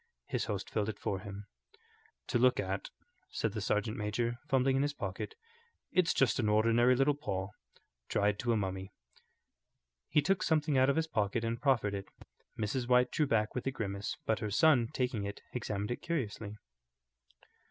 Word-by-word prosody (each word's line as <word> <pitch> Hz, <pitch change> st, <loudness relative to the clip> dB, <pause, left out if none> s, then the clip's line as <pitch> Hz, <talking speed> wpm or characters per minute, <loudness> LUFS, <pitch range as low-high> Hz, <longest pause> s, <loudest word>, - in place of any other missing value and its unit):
His -, -, -2 dB
host -, -, -3 dB
filled 105 Hz, -1 st, -1 dB
it 105 Hz, -, -4 dB
for 95 Hz, -, -2 dB
him. 100 Hz, 0 st, -8 dB, 0.8 s
"To -, -, +2 dB
look -, -, +4 dB
at," -, -, -2 dB, 0.4 s
said 110 Hz, -, -1 dB
the 105 Hz, 0 st, -4 dB
sergeant 105 Hz, +2 st, 0 dB
major, 115 Hz, +3 st, -1 dB
fumbling 135 Hz, 0 st, +3 dB
in -, -, +2 dB
his 145 Hz, +1 st, 0 dB
pocket, 445 Hz, -, -5 dB, 0.6 s
"it's 180 Hz, -2 st, +3 dB
just 130 Hz, -4 st, +2 dB
an 110 Hz, -4 st, +2 dB
ordinary 115 Hz, +4 st, +4 dB
little 135 Hz, +3 st, +3 dB
paw, 95 Hz, -10 st, -3 dB, 0.6 s
dried 105 Hz, 0 st, +1 dB
to 120 Hz, 0 st, 0 dB
a 115 Hz, -, +3 dB
mummy." 95 Hz, -1 st, -3 dB, 1.2 s
He 150 Hz, -, +4 dB
took 195 Hz, -1 st, +2 dB
something 155 Hz, -2 st, +2 dB
out 130 Hz, +1 st, +5 dB
of 140 Hz, -, +3 dB
his 160 Hz, 0 st, +2 dB
pocket 110 Hz, -5 st, 0 dB
and 115 Hz, +1 st, -2 dB
proffered 120 Hz, -8 st, +2 dB
it. 100 Hz, -1 st, -4 dB, 0.5 s
Mrs. 120 Hz, +4 st, -1 dB
White 125 Hz, 0 st, +4 dB
drew 150 Hz, -, +1 dB
back 110 Hz, -3 st, +1 dB
with 125 Hz, -, -3 dB
a -, -, +2 dB
grimace, 100 Hz, -5 st, -4 dB
but 110 Hz, -, +1 dB
her 105 Hz, -, -2 dB
son, 125 Hz, +1 st, +4 dB
taking 125 Hz, -5 st, -1 dB
it, 100 Hz, 0 st, -6 dB
examined 105 Hz, -3 st, -3 dB
it 120 Hz, -, -3 dB
curiously. 110 Hz, -10 st, -3 dB
115 Hz, 175 wpm, -32 LUFS, 105-135 Hz, 1.2 s, out